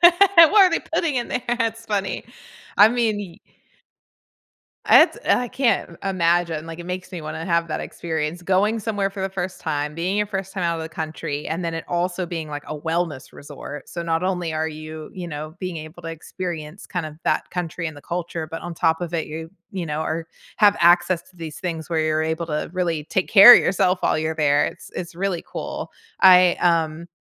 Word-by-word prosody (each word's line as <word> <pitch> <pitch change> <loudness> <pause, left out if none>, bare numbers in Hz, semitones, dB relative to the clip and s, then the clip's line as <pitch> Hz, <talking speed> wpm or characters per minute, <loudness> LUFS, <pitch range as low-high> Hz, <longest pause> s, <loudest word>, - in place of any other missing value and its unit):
What 345 - +10 0.3
are 370 +3 +8
they 330 - 0
putting 325 -3 -1
in 240 -1 -1
there? 245 - -2
That's 230 -2 -1
funny. 200 -3 -2 0.5
I 205 +2 +8
mean 230 -3 0
y 190 -5 -8 1.5
It's - - +6
I 245 -1 +3
can't, 240 -10 0
eh, 195 - -2
imagine, 170 -3 +1
like, 165 +1 -8
it 175 - -8
makes 185 +1 -5
me 175 - -5
wanna 155 +1 -6
have 170 -1 +1
that 155 - -3
experience, 160 0 -4
going 195 +5 +1
somewhere 205 -2 -1
for 195 -1 -8
the 190 - -1
first 185 -1 -5
time, 150 -1 -2
being 180 +5 -1
your 210 - +1
first 195 -2 -4
time 190 - -3
out 170 0 0
of - - -4
the 160 - -6
country, 155 -2 -5
and 165 +3 -3
then 165 -1 -3
it 165 - -5
also 180 +1 -1
being, 165 -3 -5
like, 145 -1 -6
a 155 - -5
wellness 160 -3 -2
resort, 145 0 -9
so, 170 - -4
not 165 0 -1
only 180 -3 -1
are 155 +1 0
you, 155 0 -8
you 180 -2 -6
know, 155 0 -6
being 185 -2 -4
able 155 +2 -9
to 165 - -6
experience, 165 +1 -6
kind 175 -3 -3
of, 155 -1 -8
that - - 0
country 170 -1 -3
and 160 - -5
the - - -11
culture, 170 0 -4
but 165 - -6
on 175 - -5
top 160 +1 +1
of 175 -1 -4
it, 165 -2 -1
you 160 +1 -7 0.2
you 185 -3 -4
know, 150 0 -3
are 160 +1 -3 0.3
have 205 -1 +5
access 175 0 +4
to 185 - -23
these 160 -3 -8
things 165 -3 -4
where 165 -2 0
you're 155 0 +1
able 160 +1 -2
to 150 -2 -3
really 170 -5 -1
take 185 +3 -1
care 210 +4 +11
of - - +6
yourself 185 0 +1
while - - +2
you're 160 0 -1
there, 145 -2 +3
it's - - -7
it's 170 -2 -5
really 185 -1 -2
cool. - - -6 0.3
I, 180 -1 +7
um, 165 -1 +1
170 Hz, 215 wpm, -22 LUFS, 160-190 Hz, 1.5 s, care